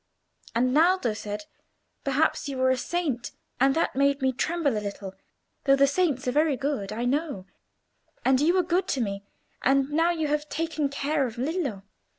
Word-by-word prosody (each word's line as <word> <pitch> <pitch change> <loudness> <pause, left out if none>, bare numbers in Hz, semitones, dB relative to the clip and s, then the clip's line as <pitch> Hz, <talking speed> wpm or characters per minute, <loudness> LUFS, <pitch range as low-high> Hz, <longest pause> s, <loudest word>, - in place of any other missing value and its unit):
And 250 +2 +2
Naldo 325 - +3
said, 210 -1 -6 0.6
perhaps 285 +1 +1
you 270 - -4
were 260 0 +3
a - - +3
saint, 270 -3 -2 0.3
and 270 +2 +4
that 330 - 0
made 280 +1 +2
me 265 -1 +1
tremble 305 -1 0
a 210 - -1
little, 200 -1 -6 0.5
though 275 -1 +6
the 275 0 +5
saints 280 -3 0
are - - +2
very 300 0 +2
good, 270 -7 -2
I 230 +3 -2
know; 280 - -1 0.8
and 265 0 +4
you 335 +5 +3
were 370 - +3
good 355 +2 0
to 265 - 0
me, 200 -2 -3 0.4
and 275 +1 +2
now 325 +3 +3
you 320 -3 0
have 300 +1 -1
taken 320 -2 -1
care 280 0 0
of 230 0 -9
Lillo. 270 - -2
275 Hz, 180 wpm, -26 LUFS, 250-315 Hz, 0.8 s, though